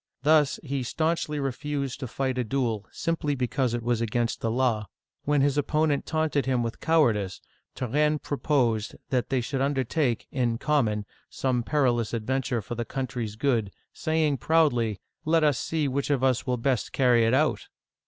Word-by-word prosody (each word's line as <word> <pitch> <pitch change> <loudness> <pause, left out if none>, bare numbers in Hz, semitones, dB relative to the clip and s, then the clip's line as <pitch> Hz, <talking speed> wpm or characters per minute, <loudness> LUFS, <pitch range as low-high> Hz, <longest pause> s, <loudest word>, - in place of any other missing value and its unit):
Thus, 150 -1 +4
he 140 -2 -2
stanchly 155 +3 -1
refused 140 0 -3
to 130 - -4
fight 130 +1 -2
a - - +1
duel, 115 -4 -1
simply 160 -3 -1
because 125 -1 0
it 120 - -4
was 120 -1 0
against 115 +1 -1
the 115 - 0
law. 115 -3 +1 0.4
When 145 -1 +3
his 145 +1 +2
opponent 150 0 +1
taunted 155 -3 0
him 125 -2 +1
with 115 0 -4
cowardice, 115 - +2 0.4
Turenne 150 +5 +1
proposed 125 -7 0 0.2
that 125 -2 0
they 130 -2 +1
should 135 +3 -2
undertake, 135 -2 0
in 120 -3 0
common, 115 -8 +1 0.2
some 130 -2 0
perilous 120 -4 +1
ad 110 -2 -4
venture 130 -3 -1
for 105 - -6
the 120 0 -2
country's 120 -4 -4
good, 115 -4 +1 0.2
saying 155 -3 +1
proudly, 120 -7 +2
" - - -54
Let 160 0 +3
us 145 -5 +3
see 155 -3 -1
which 140 +2 -1
of 140 -3 +1
us 130 -1 +2
will 125 -1 +1
best 125 0 -1
carry 125 -3 +4
it 115 +3 +3
out - - +1
130 Hz, 175 wpm, -26 LUFS, 120-145 Hz, 0.4 s, Thus